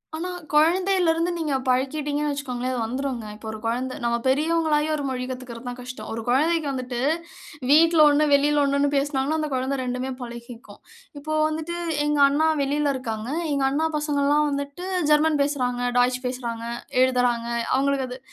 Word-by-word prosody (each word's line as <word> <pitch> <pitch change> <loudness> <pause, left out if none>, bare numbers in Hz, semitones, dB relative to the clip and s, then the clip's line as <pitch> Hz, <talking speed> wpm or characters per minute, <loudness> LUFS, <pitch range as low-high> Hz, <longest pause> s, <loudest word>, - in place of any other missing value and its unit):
ஆனா 345 +3 -4 0.2
குழந்தைலருந்து 340 +1 +3
நீங்க 310 -4 -2
பழக்கிட்டீங்கன்னு 290 +3 0
வெச்சுக்கோங்களேன் 255 -3 -3
அது - - -2
வந்துருங்க. 250 0 -3
இப்போ 220 +1 -11
ஒரு 220 - -6
குழந்த 250 +3 -1
நம்ம 235 0 +1
பெரியவங்கள்லாயும் 310 +2 +2
ஒரு 290 - -4
மொழி 255 -1 -3
கத்துக்கறது 250 -1 -6
கஷ்டம். 250 +1 -8
ஒரு 230 - -4
குழந்தைக்கு 310 +5 +2
வந்துட்டு 255 -2 -4 0.7
வீட்ல 325 +2 +5
ஒண்ணு, 290 +1 +3
வெளியிலே 290 +1 +4
ஒண்ணுனு 280 0 +2
பேசினாங்கனா 280 +2 0
அந்த 305 -1 -2
குழந்தை 260 +2 -1
2டுமே 250 +1 -3
பழகிக்கும். 235 0 -10 0.4
இப்போ 310 +2 -4
வந்துட்டு 315 +2 -4 0.3
எங்க 295 0 +1
அண்ணா 295 +3 +2
வெளில 285 +1 +1
இருகாங்க. 225 -3 -4 0.2
எங்க 280 -1 +1
அண்ணா 305 +4 +1
பசங்கல்லாம் 295 0 +1
வந்துட்டு 285 +5 -4 0.3
ஜெர்மன் 300 0 +3
பேசுறாங்க, 250 -4 -1 0.2
டச் 250 +1 +3
பேசுறாங்க, 240 -2 -4 0.4
எழுதுறாங்க. 245 -2 +1 0.3
அவங்களுக்கு 275 0 +1
அது 250 +1 -7
280 Hz, 145 wpm, -24 LUFS, 250-300 Hz, 0.7 s, வீட்ல